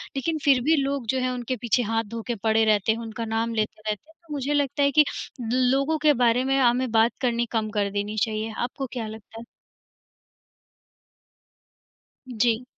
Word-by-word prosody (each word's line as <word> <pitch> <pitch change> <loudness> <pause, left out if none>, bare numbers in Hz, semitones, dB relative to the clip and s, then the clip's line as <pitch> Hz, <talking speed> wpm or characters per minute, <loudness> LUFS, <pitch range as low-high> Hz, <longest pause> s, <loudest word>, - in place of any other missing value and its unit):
लेकिन 315 +4 -1
फिर 270 -3 +5
भी 315 +4 +4
लोग 275 -3 -2
जो 260 - +1
हैं 255 0 0
उनके 250 0 -3
पीछे 245 +1 +2
हाथ 225 0 +1
धो 230 - -4
के 240 - -1
पड़े 220 0 +3
रहते 215 0 +3
हैं, 225 - -2
उनका 230 0 -5
नाम 225 +1 -1
लेते 215 0 -2
रहते 210 +9 -4
हैं। - - -28
तो 300 - -7
मुझे 285 0 -1
लगता 285 0 +1
है 280 - +3
कि 300 +1 +5 0.4
लो 250 +2 +1
लोगों 275 +4 +1
के 300 -1 +6
बारे 240 +2 +3
में 270 0 +2
हमें 250 0 +2
बात 225 +1 +4
करनी 240 -2 +1
कम 220 -2 -1
कर 205 -1 0
देनी 205 +1 -3
चाहिए। 220 0 -2
आपको 255 +2 -3
क्या 230 -3 -4
लगता 220 +1 -10
है? 230 - -8 2.9
जी। 235 0 +1
240 Hz, 195 wpm, -25 LUFS, 220-270 Hz, 2.9 s, के